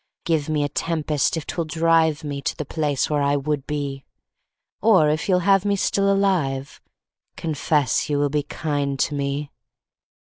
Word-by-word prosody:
Give 160 -3 0
me 150 -1 +1
a - - +1
tempest 155 0 -1
if 155 - -5
'twill 170 - -3
drive 160 -1 +2
Me 140 -2 -4
to - - -3
the 155 - -4
place 145 -2 -1
where 150 -1 0
I 140 0 +2
would 145 0 -2
be; 140 -2 -3 0.8
Or 195 -8 +5
if 155 +5 -2
you'll 180 -1 +3
have 195 -1 +4
me 205 -1 +1
still 200 0 +1
alive, 155 -10 0 0.5
Confess 150 -5 0
you 145 - +1
will 145 0 +1
be 150 0 +1
kind 145 -1 -2
to 145 - 0
me. 140 0 -3
150 Hz, 170 wpm, -23 LUFS, 140-165 Hz, 0.8 s, Or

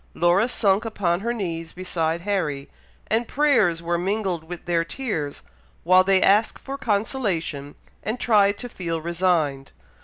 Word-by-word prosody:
Laura 175 +6 +3
sunk 205 -4 +2
upon 190 -6 -1
her 230 +4 -2
knees 165 -7 -4
beside 170 -2 -2
Harry, 170 -8 -2 0.4
and 225 +2 0
prayers 220 - +2
were 170 0 0
mingled 190 -3 -1
with 175 +1 -9
their 170 -1 +1
tears, 165 - -4 0.4
while 185 +2 +6
they 190 0 +3
asked 210 +3 +3
for 275 - -7
consolation, 200 - -2 0.3
and 220 +4 -3
tried 205 -4 +3
to 245 - -6
feel 170 -7 -4
resigned. 165 -5 0
185 Hz, 145 wpm, -23 LUFS, 165-215 Hz, 0.4 s, while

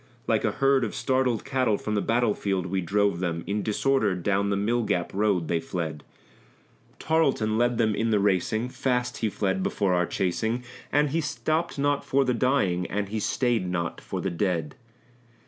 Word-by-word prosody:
Like - - +1
a - - +1
herd 135 -1 +3
of 110 - -3
startled 125 -1 0
cattle 130 -6 +1
from 105 - -4
the 105 - +1
battlefield 105 -6 0
we 95 +1 -1
drove 100 +1 +1
them; 85 -2 -2
In 105 +1 -1
disorder 110 -1 +1
down 100 +3 0
the 100 - +1
Mill 115 +4 +1
gap 90 -6 -1
road 100 -4 +1
they 85 0 +1
fled; 80 -2 -4 0.9
Tarleton 140 -9 +1
led 120 0 +2
them 110 -2 +2
in 115 +2 0
the 110 - +3
racing, 105 +4 +1
fast 125 -1 -1
he 110 - 0
fled 95 -2 -1
before 95 -1 0
our 90 -1 +2
chasing, 110 +6 -1 0.3
And 145 0 +2
he 165 +2 +1
stopped 155 +2 -1
not 145 0 +1
for 135 0 +2
the 125 - +1
dying, 115 -9 +1
and 100 0 -2
he 110 +1 -2
stayed 115 -3 0
not 85 -2 -3
for - - -5
the 95 - -2
dead. 85 -4 -1
105 Hz, 180 wpm, -26 LUFS, 95-125 Hz, 0.9 s, herd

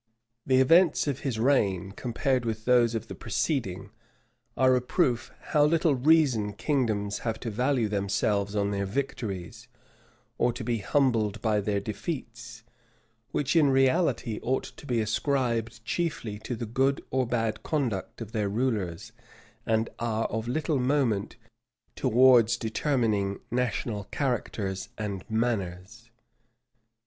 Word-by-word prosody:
The 130 -1 +4
events 165 +5 +5
of 140 -3 -2
his 130 -5 -3
reign, 100 -7 +1
compared 125 +4 -1
with 110 -1 -4
those 120 -2 +4
of 115 - -4
the - - -7
preceding, 105 - -2 0.7
are 130 -1 +5
a 125 - +1
proof 125 -3 0 0.2
how 150 - +4
little 160 0 +3
reason 130 -7 +3
kingdoms 105 -5 -1
have 115 -2 -3
to 115 - -3
value 125 +1 +1
themselves 100 0 0
on 100 -1 +1
their 100 -1 -1
victories, 110 -3 -4 0.7
or 120 0 +2
to 120 - -6
be 115 -1 -1
humbled 110 -3 +1
by 110 -2 +1
their 100 0 0
defeats; 115 - -6 0.7
which 145 +3 -1
in 155 -4 +5
reality 130 -4 +2
ought 130 +2 0
to 145 - -12
be 120 -2 +1
ascribed 115 -1 -1
chiefly 130 -9 -2
to 120 - -4
the 115 - -4
good 135 +5 0
or 130 -1 +1
bad 115 -3 -1
conduct 115 -7 -2
of 110 -2 -6
their 105 -3 -1
rulers, 105 -7 -2 0.6
and 110 0 +2
are 115 -1 -1
of 110 +1 -3
little 150 +2 0
moment 125 -6 0 0.6
towards 120 -1 +5
determining 110 -4 0
national 115 -3 -1
characters 105 -8 -2
and 100 -4 -4
manners. 110 -1 -2
115 Hz, 135 wpm, -27 LUFS, 105-130 Hz, 0.7 s, events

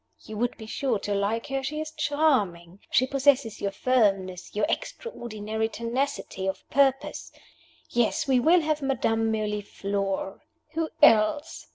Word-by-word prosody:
You 215 - -8
would 245 +1 -1
be 220 - -9
sure 240 +1 -1
to 205 +1 -3
like 200 +3 0
her 270 0 -2
she 300 +3 -3
is 310 0 -4
charming; 260 - 0
she 255 - +3
possesses 270 -4 +2
your 200 - 0
firmness, 195 -6 0
your 210 0 +2
extraordinary 220 - -3
tenacity 235 -4 -3
of 190 - -4
purpose. 270 -1 +1 0.6
Yes, 240 +3 0
we 260 -2 +4
will 335 +7 +5
have 310 -1 -1
Madame 225 -5 +1
Mirliflore. 200 -2 -2 0.3
Who 325 0 -2
else? 290 +5 +4
230 Hz, 140 wpm, -26 LUFS, 205-280 Hz, 0.6 s, will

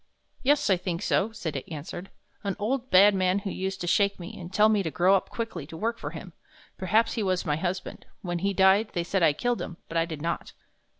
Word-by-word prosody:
"Yes, 290 +2 +3
I 190 - +4
think 175 -1 -3
so," 205 +4 +1
Sita 165 -11 -4
answered; 165 +4 -7 0.3
"an 200 -2 -2
old, 250 +5 -2
bad 200 +3 +7
man 185 0 +2
who 195 -1 -3
used 190 0 -3
to - - -2
shake 200 +3 +2
me, 175 - -8
and 175 0 -8
tell 210 +2 +5
me 215 -2 +3
to 170 - -2
grow 175 +5 +3
up 190 - -1
quickly 220 -11 -5
to 160 - -9
work 230 +5 -2
for - - -4
him; - - -9 0.4
perhaps 215 +5 +2
he 230 - -2
was 185 -3 0
my 150 -3 +1
husband. 185 +3 -4 0.2
When 175 -2 -2
he 200 +3 0
died, 195 +3 +4
they 175 - 0
said 190 +2 -1
I 160 -3 +5
killed 245 +10 -1
him, 170 - -6
but 165 - -3
I 165 - +3
did 160 -3 -6
not." 170 +3 -3
190 Hz, 235 wpm, -27 LUFS, 170-210 Hz, 0.4 s, bad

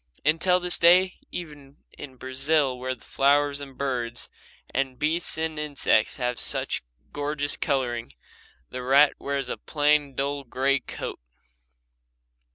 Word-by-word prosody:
Until 170 +4 +3
this 180 0 +2
day, 180 +2 +5
even 145 -5 -8 0.2
in 135 -2 -9
Brazil 135 +2 +1
where 130 0 -2
the 115 - -20
flowers 145 +1 +2
and 135 -2 -10
birds 125 -3 -2 0.4
and 130 -1 -1
beasts 160 +3 0
and 160 -1 -2
insects 145 -7 +2
have 125 -2 -1
such - - -1 0.3
gorgeous 145 0 -1
colouring, 120 -5 -1 0.6
the 125 - -5
rat 140 +3 +5
wears 140 -2 -2
a - - -4
plain 145 -2 +1
dull 140 +1 -2
grey 135 +2 +1
coat. - - -6
140 Hz, 130 wpm, -26 LUFS, 130-150 Hz, 0.6 s, day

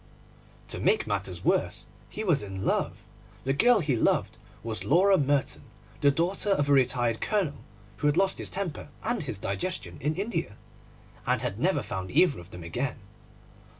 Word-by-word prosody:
To - - -3
make 440 - +2
matters - - -3
worse, - - +1 0.2
he 215 - -5
was 170 -9 +3
in 95 -1 -5
love. - - -1 0.4
The 135 - +1
girl 235 - +5
he 145 -5 +1
loved 110 - +1 0.2
was 110 -1 -3
Laura 190 +6 +5
Merton, 145 -4 +1 0.4
the 145 - +6
daughter 175 +8 0
of 145 -8 +2
a - - +5
retired 120 -4 +2
Colonel 195 -9 -1 0.3
who 145 - +1
had 145 +2 +2
lost 190 0 +2
his - - -3
temper 185 -7 -3
and 240 +2 0
his 130 -9 -4
digestion 100 - -4
in 150 +3 0
India, 180 - -2 0.7
and - - +2
had - - -3
never - - +2
found 95 0 -5
either 145 - +3
of 85 0 -12
them 90 -3 -9
again. 125 +11 -3
145 Hz, 170 wpm, -28 LUFS, 115-190 Hz, 0.7 s, the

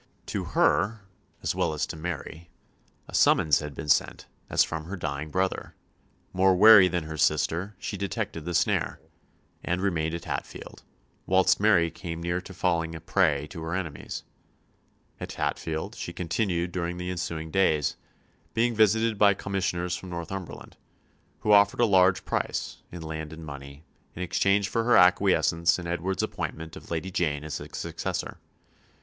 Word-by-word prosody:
To - - -3
her, 105 +3 +2 0.4
as - - 0
well - - 0
as 75 - 0
to - - -7
Mary, 85 +1 -6 0.6
a - - -13
summons 75 -2 +4
had 75 -2 -7
been 70 - -6
sent - - +1 0.2
as - - +4
from 80 -1 -5
her 95 +4 -5
dying 75 -2 -4
brother; 95 +3 -2 0.6
more 95 0 +4
wary 105 0 +9
than 90 -2 -1
her 80 0 -7
sister, 85 +7 +1
she 100 - -5
detected 100 -2 -3
the 85 +1 -3
snare, - - +1 0.6
and 90 +1 -1
remained 85 -4 0
at 85 - -7
Hatfield, - - -6 0.5
whilst 95 0 +4
Mary 95 -6 +4
came 85 -1 -6
near 85 +2 -2
to 95 - -11
falling 85 -3 -1
a - - -6
prey 80 -4 +1
to 80 - -7
her 80 +2 -3
enemies. 85 -6 -5 1.0
At - - -6
Hatfield 80 -1 -3
she 85 - -6
continued 85 0 -1
during 85 0 -3
the 90 0 -4
ensuing 85 -3 -4
days, 80 -6 +2 0.6
being 120 +1 +2
visited 110 0 +3
by 100 -1 +6
commissioners 95 -3 -2
from 90 +2 -8
Northumberland, 85 +1 -7 0.6
who 105 - +1
offered 100 +2 +5
a 120 - +5
large 95 -3 +4
price, - - -2
in 85 -2 -8
land 80 -1 -5
and 80 0 -9
money, 70 0 -9 0.3
in 90 - -4
exchange 100 +3 +2
for 115 +2 0
her 120 +1 +5
acquiescence 90 -2 +4
in 90 - -7
Edward's 90 +2 -2
appointment 80 0 -5
of - - -12
Lady 85 +3 -3
Jane 75 -5 -1
as 75 -1 -4
his - - -8
successor. - - -4
85 Hz, 160 wpm, -27 LUFS, 80-95 Hz, 1.0 s, wary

